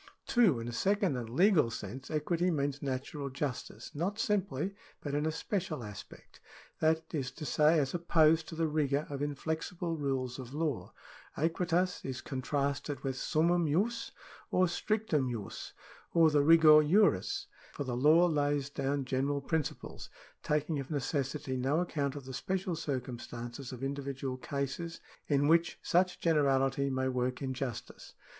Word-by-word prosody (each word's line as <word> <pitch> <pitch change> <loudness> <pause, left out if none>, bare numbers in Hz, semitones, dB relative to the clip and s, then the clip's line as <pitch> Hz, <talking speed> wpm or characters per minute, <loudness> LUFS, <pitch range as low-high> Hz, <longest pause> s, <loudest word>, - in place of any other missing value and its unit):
2. 210 - +4
In 115 - -5
a - - -3
second 195 - +1
and 120 -3 -4
legal 165 - +4
sense 115 +4 -7
equity 165 +3 0
means 145 -3 -1
natural 140 +1 -3
justice, 135 -1 -5
not 180 +7 -2
simply, 200 -6 0 0.3
but 145 - -5
in 150 +2 +1
a - - +1
special 170 - -3
aspect; 105 -3 -11 0.4
that 160 +1 +1
is 135 -5 -1
to 145 +4 -8
say, 155 +3 +4
as 140 -3 +1
opposed 160 -2 +3
to 165 - -7
the 165 0 +1
rigour 150 -2 +1
of 140 -1 -4
inflexible 160 +4 -2
rules 135 -4 -2
of 130 +1 -8
law. 150 -5 -2 0.5
Aequitas 175 +3 0
is 130 -1 -4
contrasted 140 +1 -2
with 135 -2 -2
summumjus, 170 - +1 0.4
or 185 - +3
stricfumjus, 155 - -2 0.4
or 165 -2 +6
the 145 -1 +4
rigor 155 0 +8
juris. 170 - +3 0.3
For - - -3
the 125 -3 -3
law 155 +7 +6
lays 145 -3 0
down 140 0 -1
general 135 +2 0
principles, 155 +1 -3 0.3
taking 150 0 0
of 135 - -6
necessity 135 -2 -2
no 135 +5 +1
account 145 -5 -1
of 140 -2 -7
the 130 - -7
special 185 +5 -2
circumstances 125 -3 -5
of 130 0 -7
individual 135 -1 -3
cases 140 +5 -4 0.3
in 145 -1 +2
which 165 +1 +3
such 180 +1 +2
generality 140 -3 +2
may 130 0 0
work 125 +1 -1
injustice. 130 -3 -5
145 Hz, 145 wpm, -32 LUFS, 135-165 Hz, 0.5 s, rigor